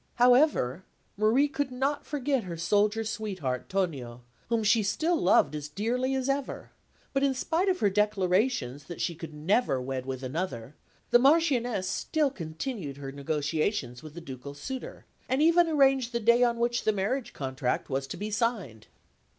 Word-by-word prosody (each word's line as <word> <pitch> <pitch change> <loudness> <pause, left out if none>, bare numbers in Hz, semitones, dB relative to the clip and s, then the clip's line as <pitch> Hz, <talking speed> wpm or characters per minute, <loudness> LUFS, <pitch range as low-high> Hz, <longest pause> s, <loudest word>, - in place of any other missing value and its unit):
However, 245 - +4 0.3
Marie 220 +8 +3
could 285 -1 -2
not 270 +3 -2
forget 275 -5 -1
her 170 -2 -6
soldier 205 +6 +2
sweetheart, 195 - -4
Tonio, 135 -11 -2 0.3
whom 230 -2 +1
she 220 +2 +4
still 315 - +1
loved 175 - +3
as 150 -1 -5
dearly 245 - -1
as 260 -1 -1
ever; 275 0 -3 0.4
but 275 - +1
in 275 -1 +2
spite 330 +8 0
of 370 - 0
her 205 - +4
declarations 190 - +1
that 175 - -8
she 175 - -1
could 165 -1 -8
never 155 - +1
wed 130 0 -4
with 130 0 -4
another, 130 -3 -4 0.4
the 240 - +7
Marchioness 250 - +3
still 300 - 0
continued 165 - -5
her 135 -1 -6
negotiations 145 - -2
with 155 0 -11
the 170 - -7
ducal 140 -2 -8
suitor, 260 - -7 0.2
and 260 +2 +1
even 335 +1 +5
arranged 270 -5 +3
the 235 - 0
day 235 +2 +4
on 240 -1 +3
which 240 0 0
the 215 - +3
marriage 215 +6 -2
contract 130 -2 -2
was 135 0 -2
to - - -6
be 210 +1 -4
signed. 205 - -2
210 Hz, 165 wpm, -28 LUFS, -, 0.4 s, the